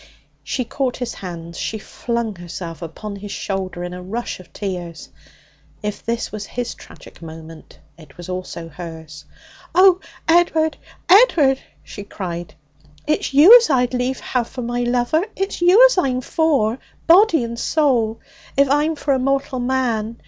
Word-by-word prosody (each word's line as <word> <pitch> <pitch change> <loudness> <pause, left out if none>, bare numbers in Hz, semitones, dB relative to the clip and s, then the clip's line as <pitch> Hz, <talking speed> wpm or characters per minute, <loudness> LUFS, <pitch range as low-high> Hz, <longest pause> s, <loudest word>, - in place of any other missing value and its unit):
She 255 - -2
caught 255 +1 -2
his 245 -2 -4
hands; 170 -2 -8
she 220 - -3
flung 230 0 -4
herself 175 -1 -8
upon 200 +5 -7
his 200 0 -8
shoulder 190 -2 -4
in 180 0 -5
a 180 - -7
rush 220 +5 -5
of 185 - -15
tears. 180 -4 -6 0.7
If 210 -1 -4
this 230 0 -3
was 210 -1 -6
his 245 -1 -4
tragic - - -15
moment, 160 0 -11 0.2
it 150 -4 -16
was 175 - -9
also 180 -2 -6
hers. 160 -2 -10 0.5
'Oh, 370 0 +6 0.3
Ed'ard, 325 -2 +3 0.3
Ed'ard!' 335 - +5 0.2
she 205 - -9
cried, 175 -4 -6 0.5
'it's 305 - 0
you 310 - +9
as 470 - +1
I'd 250 -3 +2
lief 250 +1 -1
have 245 -2 -1
for 255 - -6
my 240 +1 -2
lover! 245 +7 +1
It's 390 -1 -3
you 375 +8 +7
as - - +4
I'm 255 -6 0
for, 265 -6 +1 0.3
body 335 - +5
and 235 0 -5
soul, 240 -9 +1 0.4
if 280 0 +5
I'm 300 +3 +2
for 285 -1 0
a 265 - +1
mortal 275 0 -1
man! 240 -3 -1
235 Hz, 155 wpm, -20 LUFS, 185-280 Hz, 0.7 s, you